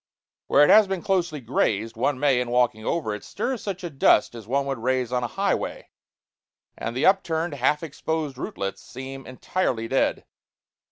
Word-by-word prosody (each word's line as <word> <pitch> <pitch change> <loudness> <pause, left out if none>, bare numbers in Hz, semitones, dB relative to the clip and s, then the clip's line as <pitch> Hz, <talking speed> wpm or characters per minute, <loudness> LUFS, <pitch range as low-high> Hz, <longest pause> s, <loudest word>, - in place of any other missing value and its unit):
Where 145 - +5
it - - +5
has 215 -1 +7
been 190 -3 -3
closely 175 -6 0
grazed, 115 -2 0
one 130 +3 0
may, 135 -3 +3
in 125 - -3
walking 120 -3 +1
over 115 -5 -1
it, 105 - -7
stir 255 +6 -3
such 200 -5 -5
a 175 - -3
dust 135 -6 +3
as 115 -3 -10
one 140 +3 0
would 135 -3 -3
raise 125 0 0
on 125 -1 0
a - - 0
highway; - - -2 0.9
and 115 +2 -4
the - - +1
upturned, 170 -4 +2
half 145 +3 +1
exposed 160 -1 -3
rootlets 100 -6 -5
seem 135 +2 -9
entirely 130 -3 -2
dead. 135 +3 0
135 Hz, 175 wpm, -25 LUFS, 120-160 Hz, 0.9 s, has